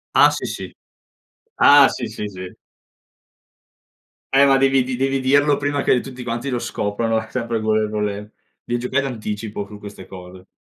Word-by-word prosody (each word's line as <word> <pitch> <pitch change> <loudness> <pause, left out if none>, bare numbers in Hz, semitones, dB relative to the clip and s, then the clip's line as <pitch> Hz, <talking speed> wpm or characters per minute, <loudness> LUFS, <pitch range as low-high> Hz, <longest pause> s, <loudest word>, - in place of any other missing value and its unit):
Ah - - +7
sì, - - -4
sì. - - -6 0.8
Ah 145 - +7
sì, 120 - -4
sì, 105 -1 -6
sì. 95 -2 -8 1.8
Eh 135 +1 +5
ma 135 -1 +4
devi 135 -1 +3
di 125 0 -4
devi 135 +1 0
dirlo 140 +2 +3
prima 145 0 -1
che 125 - +3
tutti 130 -1 -9
quanti 120 +3 -4
lo 125 - -1
scoprano 110 +1 -2
sempre 115 -1 -3
con 110 0 +1
le 110 -1 0
con 105 0 -2
le 105 +1 -5 0.3
devi 120 0 -2
giocare 130 +3 -1
d'anticipo 105 -4 -5
su 105 - -11
queste 100 -2 -11
cose. 90 0 -12
115 Hz, 170 wpm, -20 LUFS, 105-135 Hz, 1.8 s, Ah